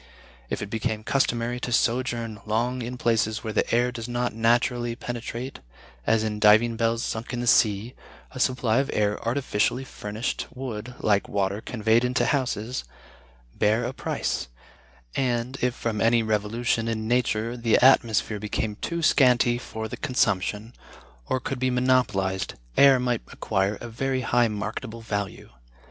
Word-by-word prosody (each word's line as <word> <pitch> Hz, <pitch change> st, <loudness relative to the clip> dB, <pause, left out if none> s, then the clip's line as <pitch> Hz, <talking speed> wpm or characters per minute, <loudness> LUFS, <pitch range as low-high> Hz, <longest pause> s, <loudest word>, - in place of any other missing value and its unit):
If -, -, -3 dB
it 100 Hz, -, -7 dB
became 110 Hz, -1 st, -2 dB
customary 120 Hz, -1 st, 0 dB
to 125 Hz, -, -4 dB
sojourn 115 Hz, -2 st, 0 dB
long 120 Hz, +4 st, 0 dB
in 125 Hz, +2 st, -5 dB
places 110 Hz, -2 st, +1 dB
where 110 Hz, -2 st, -4 dB
the -, -, 0 dB
air 120 Hz, +1 st, +2 dB
does 115 Hz, -2 st, -6 dB
not 120 Hz, 0 st, -1 dB
naturally 120 Hz, +1 st, +1 dB
penetrate, 120 Hz, +2 st, -6 dB, 0.5 s
as 110 Hz, -1 st, +3 dB
in 105 Hz, -1 st, -2 dB
diving 110 Hz, +2 st, +5 dB
bells 115 Hz, 0 st, 0 dB
sunk 115 Hz, +3 st, -4 dB
in 120 Hz, -, -2 dB
the 120 Hz, -, -2 dB
sea, 110 Hz, 0 st, +3 dB, 0.4 s
a 130 Hz, -, -8 dB
supply 125 Hz, -2 st, +2 dB
of 135 Hz, -, -1 dB
air 105 Hz, -1 st, 0 dB
artificially 120 Hz, 0 st, 0 dB
furnished 110 Hz, -2 st, -4 dB
would, 125 Hz, -2 st, -6 dB
like 100 Hz, -2 st, +2 dB
water 100 Hz, +1 st, -1 dB
conveyed 110 Hz, 0 st, +1 dB
into 125 Hz, +1 st, +1 dB
houses, 125 Hz, -3 st, -1 dB, 0.7 s
bear 110 Hz, -, +2 dB
a 125 Hz, -, -3 dB
price: -, -, -2 dB, 0.7 s
and, 125 Hz, 0 st, -1 dB
if 125 Hz, 0 st, +1 dB
from 110 Hz, -3 st, -2 dB
any 115 Hz, 0 st, +4 dB
revolution 110 Hz, +2 st, 0 dB
in 110 Hz, -1 st, -2 dB
nature 120 Hz, -1 st, 0 dB
the 115 Hz, -2 st, +2 dB
atmosphere 115 Hz, -4 st, +4 dB
became 105 Hz, 0 st, -3 dB
too 170 Hz, +6 st, -3 dB
scanty 125 Hz, -5 st, +4 dB
for 110 Hz, -2 st, -6 dB
the -, -, -7 dB
consumption, 105 Hz, -1 st, 0 dB, 0.5 s
or 130 Hz, -, 0 dB
could 130 Hz, +1 st, -4 dB
be 130 Hz, 0 st, +1 dB
monopolized, 125 Hz, -7 st, +1 dB, 0.2 s
air 135 Hz, -2 st, +7 dB
might 125 Hz, -2 st, 0 dB
acquire 100 Hz, 0 st, 0 dB
a 120 Hz, -, -7 dB
very 130 Hz, +3 st, -2 dB
high 120 Hz, -1 st, +3 dB
marketable 110 Hz, +2 st, -5 dB
value. 100 Hz, -, -4 dB
115 Hz, 155 wpm, -25 LUFS, 110-125 Hz, 0.7 s, air